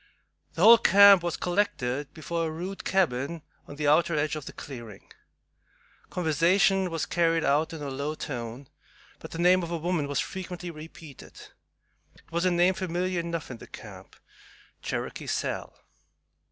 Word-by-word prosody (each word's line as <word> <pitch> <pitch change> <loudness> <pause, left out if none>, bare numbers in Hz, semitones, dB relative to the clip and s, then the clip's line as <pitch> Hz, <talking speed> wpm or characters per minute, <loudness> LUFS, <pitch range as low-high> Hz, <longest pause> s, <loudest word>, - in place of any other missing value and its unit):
The 170 - 0
whole 230 +2 +9
camp 200 -1 +7
was 175 -1 -2
collected 145 -8 -1
before 165 +1 -3
a - - -3
rude 180 +5 -6
cabin 160 -4 0 0.2
on 145 - -9
the 150 0 -2
outer 160 +2 +3
edge 150 +1 0
of 150 -3 -6
the - - -6
clearing. 120 -7 -10 1.0
Conversation 180 +3 +2
was 165 -2 -2
carried 165 -1 +1
on 150 +3 +2
in 160 -3 -7
a 140 - -4
low 140 +3 -3
tone, 125 -2 -6 0.5
but - - -9
the - - -7
name 180 +2 +4
of 170 - -5
a 170 - -2
woman 165 -2 -1
was 145 - -1
frequently 180 -2 -5
repeated. 155 -2 -12 0.8
It - - -24
was 170 +2 0
a - - +4
name 175 +1 +3
familiar 185 0 -2
enough 170 -4 -4
in 120 - -7
the - - -13
camp, - - -12 0.7
"Cherokee - - -4
Sal." - - -3
165 Hz, 160 wpm, -27 LUFS, 145-180 Hz, 1.0 s, whole